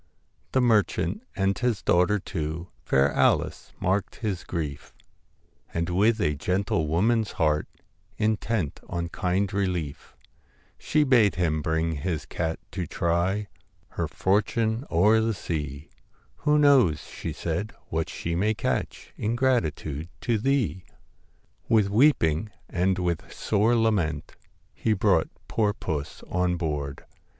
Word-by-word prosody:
The 130 - +4
merchant 115 - +2
and 95 0 +1
his 125 -4 -1
daughter 90 +4 +3
too, 85 -2 -4
Fair 70 +1 +3
Alice, - - +1
marked 95 +2 0
his 105 -6 -3
grief, 75 -5 -5 0.8
And 85 +1 -1
with 110 +5 +3
a 75 -7 +2
gentle 90 +1 0
woman's 110 +7 +1
heart, 75 -1 +1 0.5
Intent 110 -5 0
on 85 -1 -3
kind 95 +3 -1
relief, 90 -8 -2 0.6
She 150 0 +2
bade 120 -7 +4
him 80 -4 0
bring 80 +1 0
his 80 +1 -3
cat 80 -1 -2
to 90 -4 -3
try 90 +6 0 0.4
Her - - -2
fortune 110 +5 0
o'er 105 +7 +4
the 110 -1 0
sea; 75 -5 -5 0.5
1 150 0 +4
Who - - +5
knows,' 130 - +5
she - - -6
said, 85 +6 -3
' - - -37
what 80 0 -1
she 85 - -4
may 105 +6 +1
catch - - -3
In 110 +3 -1
gratitude 80 - 0
to 115 -3 +1
thee 110 - 0 0.4
!' - - -39
With 105 -3 +3
weeping 105 - +3 0.2
and 95 +1 +1
with 85 -3 -2
sore 110 +3 +2
lament 95 -10 0 0.4
He 110 - 0
brought 100 - +2 0.2
poor 105 -2 +1
puss 75 -8 -4
on 90 -1 0
board. 75 -5 -3
95 Hz, 135 wpm, -26 LUFS, 80-110 Hz, 0.8 s, Who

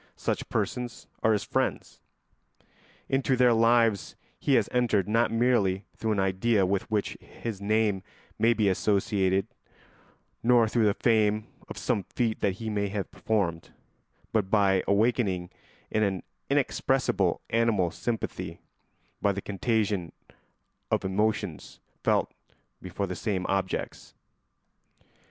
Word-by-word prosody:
Such - - -2
persons 125 -1 -3 0.2
are 110 - +3
his 105 -2 +1
friends. - - -2 1.1
Into 135 0 +1
their 125 -1 +5
lives 115 -2 +3 0.2
he 140 - +2
has 110 -5 +3
entered 115 -6 +2
not 115 +2 +2
merely 115 -5 +2
through 110 -1 -1
an 100 - -1
idea 95 +2 +2
with 95 +1 -1
which 105 -2 -1
his 110 -4 -7
name 105 -1 +1 0.4
may 115 +2 +4
be 110 -3 +1
associated, 95 -1 +1 1.0
nor 120 -1 +4
through 110 0 +2
the 105 -1 +3
fame 110 -2 +2 0.2
of - - -7
some 115 -5 0
feat 115 +3 -2
he 100 +3 -1
may 105 -2 0
have 100 0 -4
performed, 90 -7 -1 0.6
but 105 -4 +1
by 95 -3 +3
awakening 100 -4 +1 0.4
an 100 -4 0 0.3
inexpressible - - +1
animal 110 -7 +2
sympathy, 115 +5 -4 0.6
by 100 - +3
the 100 - -3
contagion 105 -3 -1 0.8
of - - 0
emotions 105 +2 -1 0.2
felt - - +1 0.5
before 95 +2 -3
the 90 -1 -5
same 100 -5 -2
objects. 95 -2 -3
105 Hz, 120 wpm, -28 LUFS, 95-115 Hz, 1.1 s, their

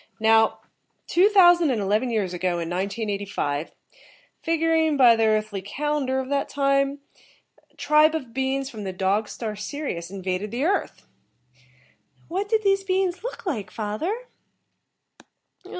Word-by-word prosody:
"Now: 220 0 +3 0.4
two 370 +4 +4
thousand 350 -5 +6
and 245 -4 0
eleven 210 +5 0
years 205 -6 -1
ago 180 0 -1
in 170 -1 -3
1985, 200 -5 -3 0.7
figuring 325 -2 +1
by 245 -3 +7
the 225 0 +2
earthly 215 -2 0
calendar 265 +5 -2
of 260 - -4
that 280 0 -1
time, 275 0 +1 0.7
a - - -32
tribe 305 +1 +3
of 260 -7 -5
beings 265 +1 -1
from 220 -6 -8
the 190 -1 -4
Dog 195 +3 0
star 220 -3 -5
Sirius 210 - -5
invaded 190 +1 -3
the 240 +5 -3
earth." 390 +5 -1 1.1
"And - - -31
what 390 +4 -2
did 440 -1 +1
these 390 -1 +2
beings 375 -1 -1
look - - -6
like, 220 - -3
father?" 275 - -4
255 Hz, 140 wpm, -24 LUFS, 205-320 Hz, 1.1 s, by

